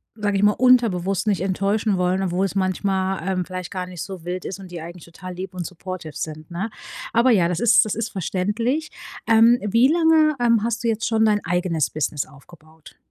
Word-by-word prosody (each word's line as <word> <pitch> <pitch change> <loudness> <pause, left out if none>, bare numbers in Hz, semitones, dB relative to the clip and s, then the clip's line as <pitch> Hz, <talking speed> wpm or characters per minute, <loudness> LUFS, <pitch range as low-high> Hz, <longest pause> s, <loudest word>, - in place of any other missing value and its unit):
sage 205 -2 -1
ich 200 - 0
mal, 210 - +5
unterbewusst 210 -6 +2
nicht 200 -5 +1
enttäuschen 200 +2 0
wollen, 180 +1 +1
obwohl 185 +1 0
es 195 - -4
manchmal, 190 0 -1
ähm, 185 -1 0
vielleicht 185 -1 -6
gar 185 -2 -4
nicht 180 -2 -8
so 190 -4 -7
wild 180 +1 -5
ist 195 - -5
und 185 - -11
die 175 - -6
eigentlich 170 +1 -9
total 180 +2 -10
lieb 185 +2 -7
und 180 -2 -5
supportive 180 -3 -7
sind, 155 +1 -6
ne? 180 +6 -4 0.4
Aber 240 +2 +4
ja, 175 -6 +3
das 180 - -2
ist 230 0 +5
das 215 -4 -3
ist 225 +1 -2
verständlich. 210 - -2 0.4
Ähm, 230 +2 +6
wie 230 +6 +4
lange, 320 -2 +4
ähm, 230 -3 +3
hast 235 +1 -2
du - - +2
jetzt 225 0 0
schon 220 -1 +2
dein 210 -1 +2
eigenes 175 -3 0
Business 150 -2 -2
aufgebaut? 155 +2 -18
190 Hz, 205 wpm, -22 LUFS, 180-220 Hz, 0.4 s, Ähm